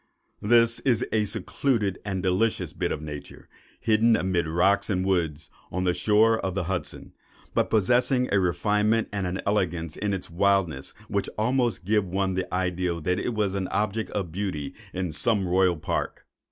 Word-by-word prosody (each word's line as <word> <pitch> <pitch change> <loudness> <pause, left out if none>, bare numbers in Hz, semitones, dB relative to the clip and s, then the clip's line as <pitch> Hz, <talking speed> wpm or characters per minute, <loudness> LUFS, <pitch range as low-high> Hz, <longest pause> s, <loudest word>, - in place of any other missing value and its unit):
This 115 +1 +4
is 125 -6 +1
a 110 -1 +2
secluded 110 -1 -1
and 95 -2 -3
delicious 95 +4 0
bit - - -2
of 75 - -3
nature, 75 -2 -8 0.3
hidden 110 +1 +3
amid 90 -4 0
rocks 100 +6 +2
and 95 -2 0
woods, 80 -6 -1 0.2
on 90 +1 -2
the 90 -1 +2
shore 110 +3 +3
of 95 -1 -3
the 100 - 0
Hudson, 90 0 -5 0.4
but - - +1
possessing 125 +4 +2
a 100 - +5
refinement 105 +5 +1
and 100 -2 -1
an 90 +1 -3
elegance 90 -6 -1
in 105 -1 -2
its 95 -2 -3
wildness 90 -6 +1
which - - -1
would - - -10
almost 120 -3 0
give 105 -1 +2
one 95 +1 -1
the 90 0 -3
idea 90 -1 -1
that 90 +3 0
it 120 - -2
was 105 -3 0
an 95 -2 -2
object 105 +3 -1
of 95 -5 -3
beauty 90 -6 -3 0.2
in 90 -2 -3
some 100 +4 +1
royal 90 -1 +3
park. - - -3
95 Hz, 175 wpm, -26 LUFS, 90-110 Hz, 0.4 s, a